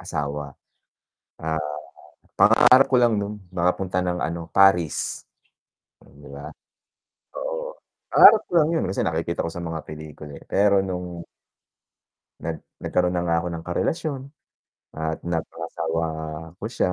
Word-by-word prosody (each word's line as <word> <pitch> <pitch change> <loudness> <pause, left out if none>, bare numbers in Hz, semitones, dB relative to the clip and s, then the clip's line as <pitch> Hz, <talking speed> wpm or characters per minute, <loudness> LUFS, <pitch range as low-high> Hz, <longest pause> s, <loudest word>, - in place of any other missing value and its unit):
asawa. 75 -1 -4 0.9
ah, 80 0 -1 0.8
pangarap 130 +2 +7
ko 130 - +4
lang 120 -3 +3
nun 105 +1 -4 0.2
nakapunta 90 +1 0
ng 90 -1 -1
ano 85 0 -4
Paris, 90 -5 +3 1.0
diba? 70 +1 -9 0.8
Oo, - - -5 0.3
pangarap 220 -1 +9
ko - - -20
lang 150 - +3
yun 160 - +1
kasi 95 - -2
nakikita 85 +1 -1
ko 85 - -3
sa 85 - -8
mga 80 -1 -4
pelikula, 75 -1 -9
eh, - - -18
pero 100 0 +3
nung 90 -2 -5 1.1
Nag 80 0 -5 0.2
nagkaroon 90 0 0
na 85 - 0
nga 85 -1 +2
ako - - -5
ng 85 0 -7
karelasyon 145 - -2 0.7
at 80 0 -2
napangasawa 85 -1 -3 0.5
ko 100 - -9
siya 105 -6 0
85 Hz, 130 wpm, -24 LUFS, 80-100 Hz, 1.1 s, pangarap